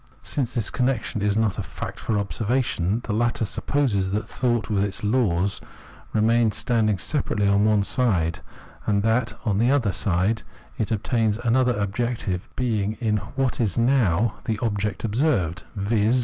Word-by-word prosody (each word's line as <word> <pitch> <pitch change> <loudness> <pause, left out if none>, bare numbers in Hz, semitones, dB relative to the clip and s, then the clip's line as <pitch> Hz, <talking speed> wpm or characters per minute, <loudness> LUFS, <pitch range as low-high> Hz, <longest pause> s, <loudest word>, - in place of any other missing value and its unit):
Since 130 -4 -2
this 115 -4 -1
connection 125 -5 -1
is 105 0 +1
not 110 -3 +1
a - - 0
fact - - -7
for 110 - -1
observation, 110 -1 0
the 110 - -3
latter 120 +1 +1
supposes 105 -5 0
that 105 +1 -1
thought 120 -3 0
with 100 -3 +1
its 100 0 -4
laws 100 -4 +1 0.5
remains 110 0 +2
standing 110 -4 +1
separately 105 - 0
on 100 +1 +4
one 105 -2 +3
side, 90 - +1 0.5
and 100 -2 +2
that, 115 +1 +1
on 105 -3 +1
the 120 +2 +3
other 130 -7 +2
side, 95 +4 0 0.4
it 110 - 0
obtains 110 0 +1
another 125 0 +2
objective 100 -2 -2
being 110 -5 0
in 110 -2 +1 0.2
what 135 -2 0
is 105 -6 0
now 115 -4 +2
the 110 -3 -1
object 105 -2 -2
observed, 110 - 0
viz. 105 +4 +2
110 Hz, 155 wpm, -24 LUFS, 100-120 Hz, 0.5 s, on